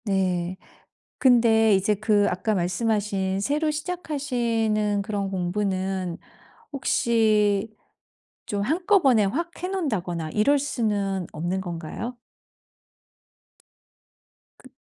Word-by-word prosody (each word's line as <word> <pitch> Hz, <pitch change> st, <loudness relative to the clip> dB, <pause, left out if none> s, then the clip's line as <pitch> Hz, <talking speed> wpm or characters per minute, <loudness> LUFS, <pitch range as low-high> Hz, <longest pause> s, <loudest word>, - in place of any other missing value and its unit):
네. 185 Hz, -3 st, 0 dB, 0.6 s
근데 230 Hz, -4 st, +5 dB
이제 195 Hz, +2 st, +2 dB
그 210 Hz, 0 st, +2 dB
아까 195 Hz, +4 st, -1 dB
말씀하신 195 Hz, +1 st, 0 dB
새로 300 Hz, +8 st, 0 dB
시작하시는 240 Hz, -, -1 dB
그런 200 Hz, -1 st, -2 dB
공부는 185 Hz, -1 st, -2 dB, 0.6 s
혹시 220 Hz, -5 st, +2 dB, 0.7 s
좀 205 Hz, -1 st, -2 dB
한꺼번에 310 Hz, -, +3 dB
확 335 Hz, -, -2 dB
해 -, -, 0 dB
놓는다거나 185 Hz, -, -2 dB
이럴 250 Hz, -, +3 dB
수는 205 Hz, -, -1 dB
없는 175 Hz, +5 st, -2 dB
건가요? 175 Hz, +7 st, -6 dB, 2.4 s
그 -, -, -17 dB
210 Hz, 195 characters per minute, -25 LUFS, 190-245 Hz, 2.4 s, 근데